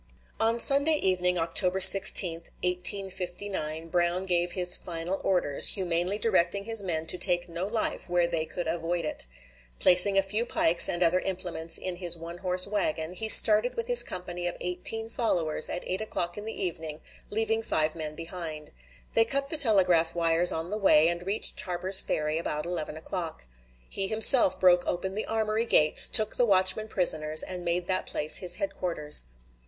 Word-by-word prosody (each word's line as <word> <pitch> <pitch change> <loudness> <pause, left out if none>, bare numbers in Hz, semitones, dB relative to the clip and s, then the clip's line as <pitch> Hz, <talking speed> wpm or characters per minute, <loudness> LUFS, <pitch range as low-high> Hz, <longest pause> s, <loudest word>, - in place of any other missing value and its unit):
On 230 +1 -1
Sunday 280 +5 +4
evening, 180 -7 -1
October 180 +3 -1
16, 190 -2 +6 0.3
1859, 180 -3 -3
Brown 175 +2 -2
gave 175 -1 -1
his 180 -1 +5
final 175 +2 -6
orders, 175 -7 +1
humanely 180 +1 -3
directing 200 -2 -1
his 225 -1 +1
men 165 -4 -4
to 180 - +2
take 175 -1 +1
no 170 +2 -7
life 220 -3 -4
where 175 0 0
they 165 -2 -4
could 175 +1 -7
avoid 170 +1 -5
it. 150 - -4 0.5
Placing 185 - +4
a 195 - +2
few 210 +4 -2
pikes 170 -7 +2
and 175 +1 -1
other 175 +2 +1
implements 180 -3 -1
in 185 -1 -6
his 175 -2 +1
one 170 +1 -11
horse 180 0 +2
wagon, 180 -5 -4
he 220 +4 -3
started 215 +3 +8
with 465 - -2
his - - +8
company 175 -1 -5
of 175 - -7
eighteen 180 +5 -1
followers 175 -11 -2
at 175 - -6
8 185 +3 -5
o'clock 175 -5 -5
in 210 - -8
the 225 - -7
evening, 160 -3 -7 0.3
leaving 225 +1 -2
five 155 -7 -2
men 155 -2 -7
behind. 165 -2 -9 0.4
They 225 - +3
cut 275 +4 -4
the 315 - -3
telegraph 180 - +1
wires 170 +1 +2
on 165 +3 -6
the 210 - -5
way, 165 -5 +2
and 175 0 -5
reached 205 +3 -2
Harper's 185 +2 +1
Ferry 155 +1 -4
about 150 -2 -6
11 160 -3 -7
o'clock. 165 - -8 0.4
He 195 - -3
himself 220 -2 +4
broke 180 -1 +2
open 190 +2 -5
the 215 - -6
armory 220 0 -3
gates, 155 -9 +4
took 215 -2 +2
the 245 - +1
watchmen 190 +2 +3
prisoners, 155 -6 0
and 180 -1 -8
made 175 +1 -4
that 185 0 -3
place 150 +1 +2
his 175 -2 +1
headquarters. 170 - -2
180 Hz, 175 wpm, -25 LUFS, 170-200 Hz, 0.5 s, started